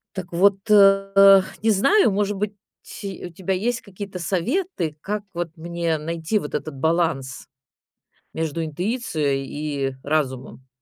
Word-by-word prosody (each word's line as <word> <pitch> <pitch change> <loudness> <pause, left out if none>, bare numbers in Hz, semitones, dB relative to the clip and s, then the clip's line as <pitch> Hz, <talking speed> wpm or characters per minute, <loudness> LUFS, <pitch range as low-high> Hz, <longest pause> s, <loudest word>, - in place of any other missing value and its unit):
Так 185 -2 -6
вот, 195 +3 +3
а, 195 -1 +7 0.2
не 225 - +4
знаю, 225 - +4
может 205 0 -1
быть, 205 +1 -2 0.5
у 190 -2 -6
тебя 190 +3 -3
есть 230 +6 -1
какие-то 200 -1 -8
советы, 185 - -1
как 210 +3 -3
вот 175 -1 -3
мне 170 0 -2
найти 165 +5 -2
вот 150 -8 -4
этот 155 - -4
баланс 160 -3 -1 0.9
между 160 0 -2
интуицией 155 - -2
и 140 -2 -3
разумом. 130 -3 -2
175 Hz, 130 wpm, -23 LUFS, 155-200 Hz, 0.9 s, а